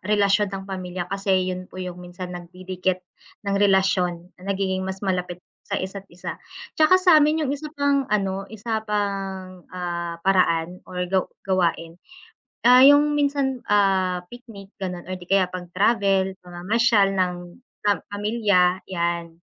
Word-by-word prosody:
relasyon 205 0 +2
ng 195 0 -6
pamilya, 185 -2 -5
kasi 190 -2 +1
yun 180 0 -7
po - - -14
yung 180 -1 -6
minsan 180 0 -8
nagdidikit 185 +1 -4 0.4
ng 200 0 0
relasyon 190 -3 +2
na 195 +1 -2
nagiging 190 -1 -1
mas 190 +1 -5
malapit 180 -2 -1 0.3
sa - - -1
isa't 195 +1 -5
isa. 175 +1 -8 0.4
Tsaka 315 +4 +6
sa'min 315 -4 +4
yung 275 - -1
isa 300 +2 -5
pang 280 -1 +1
ano 195 -2 -1
isa 220 +1 -3
pang, 195 -3 -3
ah, 170 -2 -4
paraan 180 -2 +2
or 180 -1 -3
gaw 185 +1 +1 0.2
gawain, 175 -2 -1 0.7
ah, 250 +1 +8
yung 290 +2 +6
minsan, 280 -3 0
ah, 190 -3 +2
picnic 220 -3 -13
ganon 180 -2 -4
or 185 - -4
di 180 - -10
kaya 195 -2 +4
pag 180 -1 -8
travel, 195 -1 +2
pamamasyal 195 +3 +2
ng 185 -2 +1 0.5
pam 205 - +2
pamilya 205 -3 +2
yan. 170 -1 -2
190 Hz, 145 wpm, -23 LUFS, 180-205 Hz, 0.7 s, ah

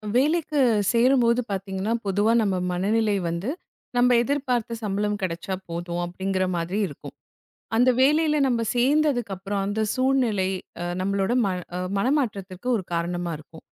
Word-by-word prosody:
வேலைக்குச் 275 - +2
சேரும்போது 240 0 +4
பார்த்தீங்கன்னா 195 +2 -2
பொதுவா 205 +3 +2
நம்ம 200 -3 +1 0.2
மனநிலை 210 +4 +1
வந்து 170 +8 -3 0.5
நம்ம 245 0 +5
எதிர்பார்த்த 250 -4 -1
சம்பளம் 205 0 -1
கிடைச்சா 180 +1 -3 0.2
போதும் 170 +1 -3
அப்படிங்கிற 185 +2 -1
மாதிரி 175 +4 -2
இருக்கும். - - -10 0.6
அந்த 250 +2 +5
வேலைல 300 +3 +4
நம்ம 240 -2 +1
சேர்ந்ததுக்கு 250 -4 +2
அப்புறம் 195 +1 -3
அந்த 205 +2 -1
சூழ்நிலை 255 -7 +1 0.5
நம்மளோட 195 +2 0
மன 185 -2 -1 0.4
மனமாற்றத்துக்கு 210 -5 -1
ஒரு 195 - -4
காரணமா 170 0 -2
இருக்கும். 160 +1 -15
210 Hz, 120 wpm, -24 LUFS, 190-250 Hz, 0.6 s, நம்ம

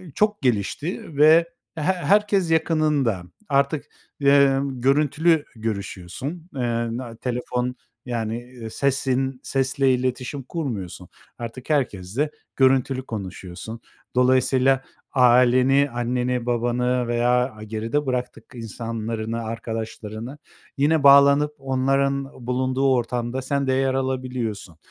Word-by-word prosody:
çok 210 0 +1
gelişti 140 - -2
ve 160 +3 +6 0.3
he 160 - -4
herkes 190 +1 +2
yakınında. 155 - +1 0.3
Artık, 140 +1 +1 0.4
emm, 140 -2 +3
görüntülü 150 +4 +3
görüşüyorsun, 110 - -5
eee, 130 - -2 0.4
na 120 -2 -7
telefon, 125 +1 -3 0.3
yani, 120 0 -5
sesin 135 -1 0
sesle 135 0 +1
iletişim 130 +2 -2
kurmuyorsun. 100 - -5 0.3
Artık 120 +3 -8
herkesle 130 -1 -1 0.2
görüntülü 130 0 +2
konuşuyorsun. 95 +1 -7 0.3
Dolayısıyla 130 +1 +3 0.3
aileni, 125 +2 +5
anneni, 125 0 -1
babanı 120 +1 0
veya, 120 +1 +1 0.2
aaa, 110 0 -11
geride 115 +7 -2
bıraktık 125 -1 -3
insanlarını, 115 0 -4
arkadaşlarını, 115 +2 -6 0.4
yine 150 +2 +2
bağlanıp 140 +1 +6
onların 135 -1 -1
bulunduğu 130 +1 +1
ortamda 120 +1 -2
sen 140 +1 -1
de 130 - +2
yer 135 0 +1
alabiliyorsun. 125 -8 -3
130 Hz, 100 wpm, -23 LUFS, 115-140 Hz, 0.4 s, ve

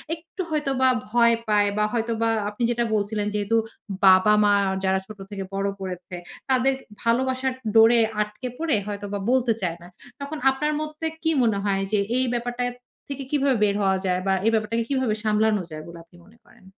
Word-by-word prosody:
একটু 335 +3 -9
হয়তোবা 275 -4 +1 0.2
ভয় 235 0 +4
পায়। 205 -1 +3
বা 210 - +3
হয়তোবা 230 -1 0 0.2
আপনি 210 +3 -5
যেটা 240 0 0
বলছিলেন 210 0 -1
যেহেতু 210 +2 +1 0.5
বাবা-মা 205 +2 +6 0.2
আর 190 - -1
যারা 190 0 +2
ছোট 215 -1 -10
থেকে 195 -1 -4
বড় 195 0 0
করেছে 180 -1 -6 0.3
তাদের 260 +1 +3 0.3
ভালোবাসার 260 +2 0 0.2
ডোরে 225 +1 +7 0.2
আটকে 210 +4 -4
পড়ে 320 -5 +1
হয়তোবা 205 0 -4
বলতে 250 -3 +3
চায় 170 -2 -2
না। 175 - -12 0.3
তখন 285 +2 -5
আপনার 300 +3 -1
মধ্যে 310 +1 -4 0.2
কি 320 - +2
মনে 220 -3 +2
হয় 195 -1 +1
যে 210 - +2 0.2
এই 260 - +2
ব্যাপারটা 245 +1 -2 0.5
থেকে 275 -1 -5
কিভাবে 275 -3 +2
বের 200 -1 +2
হওয়া 190 -1 +2
যায় 180 0 0
বা 195 - +3
এই 225 - +4
ব্যাপারটাকে 225 +1 0
কিভাবে 260 -6 0
সামলানো 215 -1 +2
যায় 155 0 -7
বলে 170 0 -10
আপনি 170 - -24
মনে 220 +5 -21
করেন? - - -22
225 Hz, 180 wpm, -24 LUFS, 205-260 Hz, 0.5 s, ডোরে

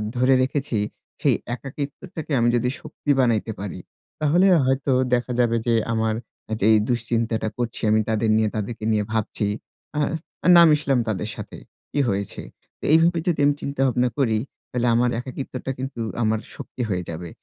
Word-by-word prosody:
ধরে 125 +2 +4
রেখেছি 135 -2 -1 0.4
সেই - - +4 0.2
একাকিত্বটাকে 145 +5 -7
আমি 120 0 +3
যদি 125 +1 +1
শক্তি 145 - -3
বানাইতে 115 -3 +2
পারি, 95 -2 -5 0.4
তাহলে 155 +5 +3 0.2
হয়তো 135 +1 +1 0.2
দেখা 125 +1 +1
যাবে 120 -1 +3
যে 120 - +3 0.2
আমার 110 0 +1 0.3
অ্যা - - -4
যেই 110 +2 +6
দুশ্চিন্তাটা 115 -2 0
করছি 120 -1 -3
আমি 110 +1 +4
তাদের 110 0 +1
নিয়ে 110 -1 +2
তাদেরকে 110 +1 -4
নিয়ে 105 -1 +2
ভাবছি, 110 -1 -1 0.5
আ - - +2 0.6
না 170 - +9
মিশলাম 145 -3 +2
তাদের 105 -4 -2
সাথে। - - -8 0.3
কি - - -1
হয়েছে? 100 -1 -3 0.4
তো - - -21
এইভাবে 165 +1 +4
যদি 175 - +1
আমি 145 - +4
চিন্তা 140 -1 -3
ভাবনা 125 0 +2
করি 115 -5 +2 0.3
তাহলে 125 -1 0
আমার 120 +1 +3
একাকিত্বটা 130 0 -5
কিন্তু 130 -1 -5 0.2
আমার 110 0 +1 0.2
শক্তি - - -7
হয়ে 90 -2 -1
যাবে। 85 +1 -6
120 Hz, 160 wpm, -23 LUFS, 110-135 Hz, 0.6 s, না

